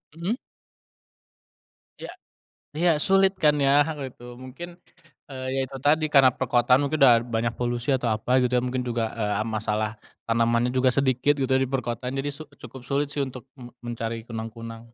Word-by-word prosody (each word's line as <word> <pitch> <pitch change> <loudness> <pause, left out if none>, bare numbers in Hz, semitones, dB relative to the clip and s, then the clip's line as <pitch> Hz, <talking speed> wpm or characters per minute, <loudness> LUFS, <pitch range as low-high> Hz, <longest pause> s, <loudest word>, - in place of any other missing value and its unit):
Mhm. 190 +10 -2 1.6
Ya, - - -8 0.7
ya 175 +1 +3
sulit 195 +1 +4
kan 150 -1 +4
ya 140 -1 +2 0.4
gitu, 120 0 -13
mungkin, 155 +8 -9 0.5
eee, 130 -1 -6
ya - - +1
itu 135 +1 -9
tadi 155 +3 +3
karena 135 -2 +7
perkotaan 125 +1 +2
mungkin 150 +2 -1
udah 125 -3 +8
banyak 115 -1 -2
polusi 120 +1 -3
atau 125 -2 -2
apa 110 +3 -4
gitu 125 0 0
ya - - -1
mungkin 125 0 -2
juga, 120 -2 -1
eee, 105 -1 -1
masalah 110 0 -2 0.3
tanamannya 115 +1 +2
juga 130 0 +3
sedikit 135 +1 +2
gitu 130 - 0
ya 130 - +3
di 130 - -7
perkotaan, 125 -1 -3
jadi 140 +2 -2
su 155 - -8 0.2
cukup 130 -2 -11
sulit 140 +2 -1
sih 145 - -1
untuk 130 0 -10
me 120 -2 -11 0.2
mencari 115 -1 -5
kunang-kunang. 115 0 -7
125 Hz, 170 wpm, -25 LUFS, 115-140 Hz, 1.6 s, udah